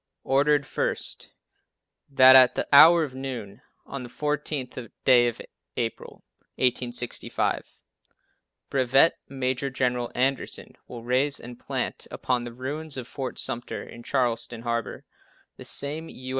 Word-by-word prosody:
Ordered, 145 +1 +2
first: - - -3 0.8
That 130 -1 +7
at 130 -1 +7
the - - -2
hour 160 +4 +9
of 140 -4 -5
noon, 130 -5 -7 0.2
on 135 - -6
the 120 - -8
14th 140 -4 -4 0.2
day 120 -2 +6
of 120 -1 -4 0.4
April, 115 -1 -5 0.3
1865, 125 -1 -1 0.9
Brevet 135 +4 +3
Major 130 0 -2
General 125 -2 -1
Anderson 135 +1 -2
will 120 -2 -9
raise 130 +4 +1
and 120 0 -11
plant - - -4
upon 125 -2 -2
the 120 - -7
ruins 140 +5 -5
of 125 -2 -6
Fort 130 -2 -6
Sumter, 120 +1 -4
in 120 - -12
Charleston 120 -2 0
Harbor, 115 -1 -3 0.5
the - - -10
same 155 +3 -1
U. 130 0 -9
130 Hz, 130 wpm, -25 LUFS, 120-140 Hz, 0.9 s, hour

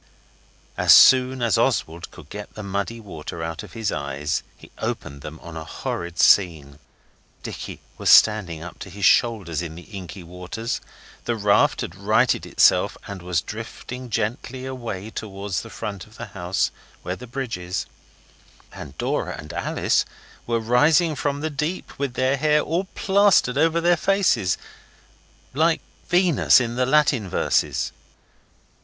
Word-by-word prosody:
As - - +7
soon 130 -1 +6
as 115 -3 +2
Oswald 85 +2 0
could - - -15
get 105 +1 -8
the 110 - -7
muddy 100 +4 -3
water 85 -5 -7
out 80 0 -4
of - - -12
his 110 -3 -2
eyes 70 0 -2 0.2
he - - -16
opened 70 0 -4
them 75 +3 -8
on 85 -1 -9
a 80 - -5
horrid 85 +2 -5
scene. 80 -9 +3 0.6
Dicky - - -7 0.2
was - - +1
standing 90 -7 +5
up 90 - -10
to - - -8
his 100 +1 -3
shoulders 100 -9 +3
in 80 -2 -6
the 90 - -10
inky 95 -2 -9
waters; 90 +7 -5 0.4
the 120 - 0
raft 105 -2 +3
had - - -5
righted 110 +6 +1
itself, - - +3
and 100 -2 -7
was 90 -3 0
drifting 120 +3 -7
gently 120 +4 -3
away 115 -6 -5
towards 100 -3 -4
the - - -10
front 100 -2 -6
of 110 - -18
the - - -6
house, 90 -1 -1 0.3
where - - -3
the 125 - -11
bridge 125 -5 -4
is, 90 +2 -3 0.9
and 70 0 -10
Dora - - -2
and 75 0 -9
Alice - - +1 0.4
were 115 -1 +1
rising 150 +8 +3
from 145 +1 -2
the 160 0 -2
deep, 150 +4 -4
with 140 -3 -2
their 130 +2 +1
hair 150 +1 +3
all 170 +5 -1
plastered 195 -9 +3
over 165 +3 +3
their 175 +1 +3
faces 165 - +2 1.0
like 160 +4 +2 0.3
Venus 175 -7 +4
in 120 -2 -2
the 125 0 +1
Latin 135 -8 +3
verses. - - 0
110 Hz, 155 wpm, -23 LUFS, 90-130 Hz, 1.0 s, As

